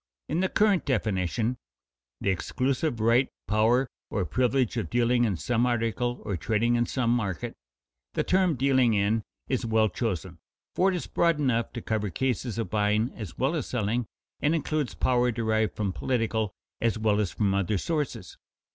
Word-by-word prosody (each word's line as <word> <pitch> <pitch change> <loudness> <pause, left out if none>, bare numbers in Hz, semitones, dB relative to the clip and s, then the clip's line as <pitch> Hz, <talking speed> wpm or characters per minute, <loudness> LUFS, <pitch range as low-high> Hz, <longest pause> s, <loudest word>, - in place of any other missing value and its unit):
In 160 - -1
the 190 0 +1
current 205 -4 +3
definition, 110 -1 0 0.6
"The 100 - +2
exclusive 130 - -1
right, 115 +4 +3 0.2
power, 115 +5 +3 0.2
or 100 -4 -1
privilege 125 - +1
of 115 - -2
dealing 120 0 +3
in 100 -6 0
some 120 +6 +1
article 120 +1 -1
or 100 - -1
trading 115 +6 +1
in 120 -1 +2
some 120 -3 0
market," 100 -9 -2 0.6
the - - +1
term 185 -3 +2
"dealing 130 -3 +3
in" 105 +3 +2 0.3
is 130 -1 -1
well 110 -1 +2
chosen, 95 -7 -3 0.3
for 190 +2 +3
it 190 - 0
is 175 - -3
broad 170 -3 +2
enough 120 -5 +1
to 120 - -6
cover 105 -2 -1
cases 125 +2 -2
of 115 - -3
buying 105 +2 +1
as 105 -7 -8
well 135 +5 +1
as 160 - -2
selling, 115 0 -1 0.3
and 155 +3 +2
includes 155 -4 -1
power 125 -1 +2
derived 110 -1 0
from 100 -3 -1
political 110 -3 -1 0.3
as 115 -2 +1
well 110 -1 +2
as 105 -4 +1
from 100 +2 +1
other 100 +1 +1
sources. 150 - -3
115 Hz, 170 wpm, -27 LUFS, 105-130 Hz, 0.6 s, current